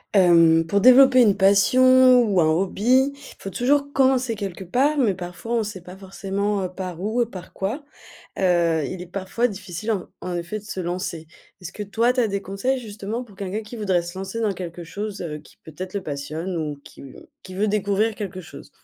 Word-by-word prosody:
Hem, 165 -3 +5
pour 200 +4 +2
développer 255 +3 +7
une 210 -5 +4
passion 255 +6 +5
ou 205 -6 +1
un 165 - +4
hobby, 215 - +2 0.3
faut 195 - -6
toujours 280 +8 +1
commencer 260 -3 +2
quelque 195 -3 -6
part, 265 - +1
mais 215 -8 +2
parfois 180 +5 -5
on 230 - +1
sait 205 -3 -7
pas 180 +2 -12
forcément, 200 +1 -3
heu, 185 - -3
par 180 -2 -7
où 220 +5 +1
et - - -4
par 185 -5 -10
quoi. 225 +10 -4 0.5
Heu, 170 -4 +2
il 185 +5 -6
est 180 - -8
parfois 195 +5 -1
difficile 200 0 -5
en 195 -5 -3
en 180 - -4
effet 175 +5 -4
de - - -18
se 210 - -6
lancer. 175 -2 -4 0.3
Est-ce 180 0 -7
que - - -8
toi, 230 +5 +1
tu 255 - -1
as 235 - +3
des 200 -1 -3
conseils, 195 +8 -2
justement, 215 +1 -6
pour 210 -5 -17
quelqu'un 195 +2 -4
qui 215 +3 -10
voudrait 190 -6 0
se 175 +1 -8
lancer 195 +4 -5
dans 220 -2 +1
quelque 175 -1 -7
chose, 205 +4 -6
heu, 155 -3 -5
qui - - -20
peut-être 185 +5 -8
le 200 - -3
passionne 155 +5 -4
ou 150 -3 -4
qui - - -14 0.4
qui 185 - -11
veut 205 +3 +1
découvrir 210 +1 +1
quelque 195 -4 -6
chose? 160 - -12
195 Hz, 205 wpm, -23 LUFS, 180-225 Hz, 0.5 s, développer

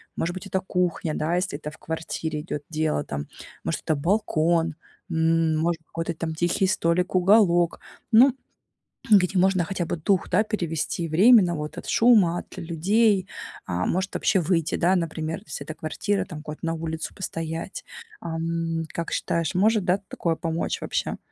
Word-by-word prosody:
Может 175 +2 -2
быть, 185 - -7
это 190 0 0
кухня, 180 -4 -1
да, 160 +3 0
если 180 -5 -2
это 150 0 -7
в - - -16
квартире 160 -1 -4
идет 150 -2 -5
дело 155 -2 0
там. 70 - -5 0.4
Может, - - -2
это 155 - 0
балкон, 165 -1 +1 0.3
м, 165 0 +2
может, 165 +1 0
какой-то 165 +1 -4
там 160 0 -4
тихий 175 +3 +1
столик, 180 0 +1
уголок. 180 -3 +4 0.3
Ну, 245 +4 +7 0.8
где 195 -2 +5
можно 185 -1 +3
хотя 180 0 -3
бы - - -2
дух, 180 +3 +1
да, 185 +4 +4
перевести 170 -5 -2
временно 185 +3 +6
вот 150 -1 -5
от - - -7
шума, 205 -8 +4
от - - -12
людей, 190 +4 +2 0.4
а, 90 +1 -1
может 190 +2 -1
вообще 195 - +2
выйти, 165 -1 0
да, 180 +3 +3
например, 160 -2 -2
если 150 -1 -6
эта 155 - -7
квартира, 190 +5 -2
там 155 -6 -8
куда-то 150 +1 -7
на 165 - 0
улицу 160 0 -4
постоять. 165 0 -5 0.3
Ам, 165 0 -2
как 170 -1 -4
считаешь, 165 -1 -1
может, 210 +1 +3
да, 180 +2 +2
такое 165 -1 -1
помочь 165 0 -2
вообще? - - -2
170 Hz, 165 wpm, -25 LUFS, 160-185 Hz, 0.8 s, Ну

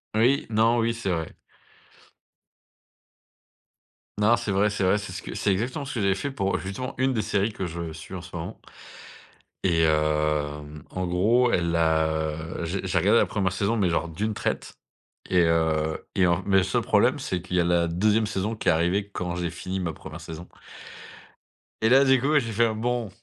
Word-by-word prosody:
Oui, 125 +6 +3
non, 115 +2 +3
oui 115 0 +1
c'est 115 -4 -4
vrai. 80 -3 -2 2.8
Non, 110 +3 +5
c'est 105 - -3
vrai, 100 +2 +3
c'est 105 -1 -2
vrai, 95 +3 +3
c'est 100 -2 -7
ce 90 - -7
que - - -7
c'est 100 - 0
exactement 125 +9 -2
ce 140 - -6
que 115 - -1
j'avais 100 -1 +3
fait 140 - -3
pour, 100 -8 -1
heu, - - -1
justement 125 +8 -5
une 130 0 +2
des 110 -3 -1
séries 100 +2 0
que 95 -2 -4
je 85 -1 -5
suis 80 +4 -10
en 90 - -5
ce 90 +1 -11
moment 85 +5 -6 1.1
et 85 -3 +3
hem, 75 -1 0
en 95 -1 -3
gros 110 +8 +3
elle 85 -1 +1
a, 80 -1 +3
heu, 80 +2 -3
j'ai 95 +4 -3
j'ai 90 0 0
regardé 105 +7 +4
la - - +4
1re 95 -3 -1
saison 100 +4 0
mais 95 -4 +2
genre 85 0 -1
d'une 105 +7 -2
traite - - -3 0.6
et 90 -2 +4
heu 80 -1 +1
et 95 -2 +4
en 85 +1 +1
mais 100 -1 +3
le 95 - +4
seul - - 0
problème - - +3
c'est 90 -2 -3
qu'il 90 +1 -5
y 90 - +4
a - - +2
la 85 0 +2
2e 105 +6 +2
saison 105 +3 -2
qui - - -5
est - - +7
arrivée 90 +5 +1
quand 90 -3 -4
j'ai 90 -1 -2
fini 90 +3 -5
ma 85 -3 -2
1re - - -10
saison 80 +2 -8 1.4
et 110 - +3
là 135 +2 +6
du 135 -1 +5
coup 150 +3 +3
j'ai 115 -4 -4
fait 115 +2 +3
un: 110 -1 -1
«Bon, 120 0 -1
95 Hz, 205 wpm, -25 LUFS, 85-110 Hz, 2.8 s, est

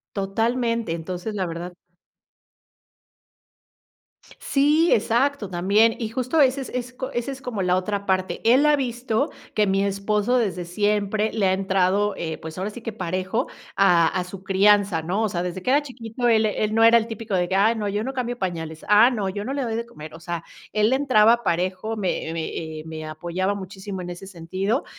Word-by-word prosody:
Totalmente, 230 +2 0
entonces, 180 +5 -5
la 190 -2 -1
verdad 170 +1 -6 2.7
Sí, 300 +4 +3
exacto 235 +1 +1
también. 200 +6 +3
Y 225 -2 -3
justo 255 +6 -1
ese 270 0 +3
es 265 - -6
ese 250 +1 -4
es 270 0 -8
co 250 - -5
como 205 - -2
la 180 -1 +2
otra 200 +2 -2
parte. 185 -1 0
Él 260 +6 +5
ha 300 - +5
visto 240 -3 -1 0.2
que 210 -1 +2
mi 195 +1 +2
esposo 205 +4 +1
desde 190 -7 -1
siempre 210 +3 0
le 210 -3 +1
ha 185 - +3
entrado, 195 +1 +1
eh, 160 -2 -4
pues 160 +1 -9
ahora 190 +3 -2
sí 235 +3 -10
que 225 -1 -5
parejo 185 +4 -2 0.3
a 175 -4 +5
a 185 - -1
su 180 +1 -10
crianza, 195 -2 +3
¿no? 185 +7 -1
O 215 - +1
sea, 175 -2 -2
desde 180 +1 -4
que 215 - -2
era 290 - +4
chiquito, 245 -3 -4
él 220 -1 +4
él 215 0 -1
no 225 +1 +4
era 230 +1 +8
el 230 0 0
típico 225 -3 -6
de 175 -1 0
que: 190 - 0
"Ay, 215 +4 +4
no, 210 -2 -2
yo 205 +2 -1
no 265 +3 -4
cambio 245 -2 -3
pañales. 160 -4 -4
Ah, 215 +4 +7
no, 210 -6 -2
yo 205 +2 -4
no 265 - -3
le 280 -1 -1
doy 230 -2 -2
de 230 +1 -3
comer". 155 -10 -11
O 160 - -10
sea, 170 0 -5 0.3
él 215 +3 +3
entraba 235 -4 +4
parejo, 185 +6 -1
me 185 -5 -2
me 165 -1 -2
eh 160 -1 -6
me 160 -1 -7
apoyaba 175 +5 -2
muchísimo 190 0 -7
en 175 - -6
ese 175 +2 -8
sentido 190 - -2
205 Hz, 195 wpm, -23 LUFS, 185-230 Hz, 2.7 s, era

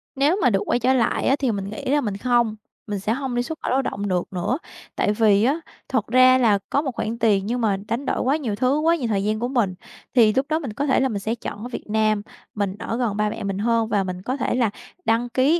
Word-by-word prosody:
Nếu 285 +6 +3
mà 250 - +5
được 195 -2 +2
quay 240 - +1
trở 255 +2 +3
lại 235 -3 +1
á, 270 - +4
thì 265 -4 +1
mình 200 -1 -4
nghĩ 215 - -7
là 290 +2 +2
mình 205 -5 -3
không, 240 -1 +1 0.3
mình 205 -2 -3
sẽ 210 +3 0
hông 260 -1 -3
đi 245 - +1
xuất 315 +3 -6
khẩu - - -2
lao 265 +1 +3
động 205 -5 -3
được 180 0 -2
nữa. 185 +9 -1 0.4
Tại - - +1
vì 210 -1 +4
á, 285 +7 +2 0.3
thật 225 -5 -1
ra 255 +2 +6
là 215 -5 +3
có 280 - +2
một 275 - -3
khoản 225 +2 -3
tiền 200 -3 +2
nhưng 240 +2 -1
mà 205 -3 +2
đánh 245 +5 -2
đổi - - -1
quá 275 +4 +2
nhiều 235 -9 -3
thứ, 255 +6 +1
quá 330 +2 +3
nhiều 255 -8 -2
thời 200 -3 0
gian 215 +1 0
của 245 - -1
mình 235 -8 +1 0.4
thì 220 -4 +6
lúc 265 +1 +1
đó 315 +1 +1
mình 255 -9 -5
có 285 +5 -2
thể 265 - +3
là 265 0 +2
mình 205 -3 -2
sẽ 220 +4 -2
chọn 210 -2 -7
ở 245 - -5
Việt - - -6
Nam. 215 -1 +2 0.3
Mình 200 -2 -1
ở 230 - -3
gần 225 -5 -1
ba 210 0 +1
mẹ 210 - -6
mình 195 -1 -2
hơn 230 +1 +1
và 200 -3 +2
mình 185 -1 -5
có 255 +7 -3
thể - - -1
là 235 -4 +2 0.4
đăng 230 +2 +1
ký 275 +8 +3
230 Hz, 280 wpm, -23 LUFS, 210-260 Hz, 0.4 s, ra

